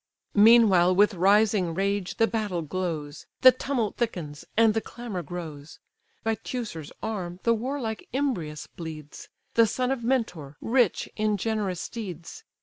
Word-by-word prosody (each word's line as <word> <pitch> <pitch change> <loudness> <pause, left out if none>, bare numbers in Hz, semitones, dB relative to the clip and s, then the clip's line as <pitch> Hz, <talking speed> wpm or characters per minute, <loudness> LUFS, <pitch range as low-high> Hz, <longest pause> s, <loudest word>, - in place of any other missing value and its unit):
Meanwhile 205 -5 +6
with 205 +2 +4
rising 195 -1 +3
rage 200 0 -1
the 225 - +5
battle 210 -7 -2
glows, 155 -3 -4
The 255 - +10
tumult 255 -4 -2
thickens, 165 -11 -3
and 225 -1 +5
the 225 - 0
clamour 230 -7 -6
grows. 160 -4 -8 0.5
By 225 +1 +1
Teucer's 210 - -5
arm 185 -5 -4
the 230 - +4
warlike 230 -1 -4
Imbrius 235 - -2
bleeds, 155 -3 -9 0.2
The 230 -1 +5
son 250 +4 -1
of 260 -3 -2
Mentor, 180 - -1
rich 240 -4 +1
in 215 -1 +1
generous 200 -4 -2
steeds. 195 - -7
205 Hz, 140 wpm, -26 LUFS, 175-230 Hz, 0.5 s, The